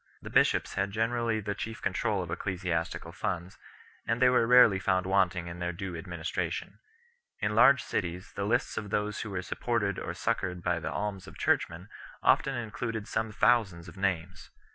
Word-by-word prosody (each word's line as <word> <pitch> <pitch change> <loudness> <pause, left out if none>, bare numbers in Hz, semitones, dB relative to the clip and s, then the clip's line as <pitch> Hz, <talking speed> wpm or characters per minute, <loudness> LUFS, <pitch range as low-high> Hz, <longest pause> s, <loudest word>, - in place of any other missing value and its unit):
The - - -8
bishops - - +3
had 100 0 0
generally 115 +1 0
the 100 0 -2
chief 110 +2 -6
control - - 0
of - - -7
ecclesiastical 90 -3 -2
funds, 90 +2 -4 0.5
and 115 +1 +1
they 130 0 +6
were 125 -2 +3
rarely 120 -5 +7
found 95 -1 +1
wanting 95 -2 +2
in 85 0 -7
their 90 0 -1
due 90 +1 -5
administration. 85 -1 -4 0.6
In 105 - 0
large 130 +5 +6
cities 90 +1 -3
the 100 - -3
lists 120 +3 0
of 105 -1 -8
those 105 +1 -1
who 105 - -5
were 90 -2 -3
supported 105 -4 -1
or - - -5
succoured 90 -1 -2
by - - +1
the - - -4
alms 100 -2 -3
of - - -11
churchmen 85 +3 0 0.4
often 135 - +3
included 115 -1 -4
some 110 0 -1
thousands 100 -7 +2
of 85 - -11
names. 90 -3 -2
100 Hz, 175 wpm, -29 LUFS, 90-110 Hz, 0.6 s, rarely